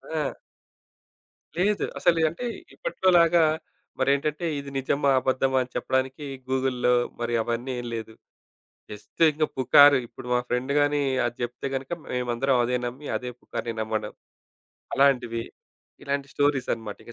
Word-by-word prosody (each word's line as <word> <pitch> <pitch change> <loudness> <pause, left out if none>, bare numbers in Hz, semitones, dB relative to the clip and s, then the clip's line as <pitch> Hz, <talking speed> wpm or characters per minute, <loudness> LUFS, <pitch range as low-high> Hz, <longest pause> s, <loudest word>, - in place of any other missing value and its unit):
ఆ! - - 0 1.4
లేదు. 205 +3 +2
అసలి 170 -2 +3
అంటే, 205 +11 -6 0.3
ఇప్పట్లోలాగా 175 - +3 0.6
మరేంటంటే, 140 +5 +1
ఇది 140 0 -9
నిజమా, 140 +1 +1
అబద్ధమా, 130 0 +1
అని 125 - -8
చెప్పడానికి 130 +2 -1 0.2
గూగుల్‌లో 130 -2 +1 0.3
మరి 120 0 -1
అవన్నీ 120 +3 -3
ఏం 120 - -7
లేదు. 110 -1 -6 0.8
జస్ట్ 105 +9 -6
ఇంక 155 +1 0
పుకారు, 140 +2 +7
ఇప్పుడు 120 - -12
మా 125 - +3
ఫ్రెండ్ 125 +3 -1
గాని, 145 0 +2 0.3
అది 120 0 -4
జెప్తే 120 +2 -4
గనక 135 0 -4 0.2
మేమందరం 125 +1 0
అదే 125 +1 0
నమ్మి, 130 +5 -6
అదే 125 0 -4
పుకారుని 115 -1 -5
నమ్మడం, 110 -1 -2 0.8
అలాంటివి. 125 -4 +2 0.6
ఇలాంటి 140 0 -2
స్టోరీస్ 145 -2 +1
అన్నమాట 110 -3 -5
ఇక 115 - -11
130 Hz, 130 wpm, -26 LUFS, 120-145 Hz, 1.4 s, పుకారు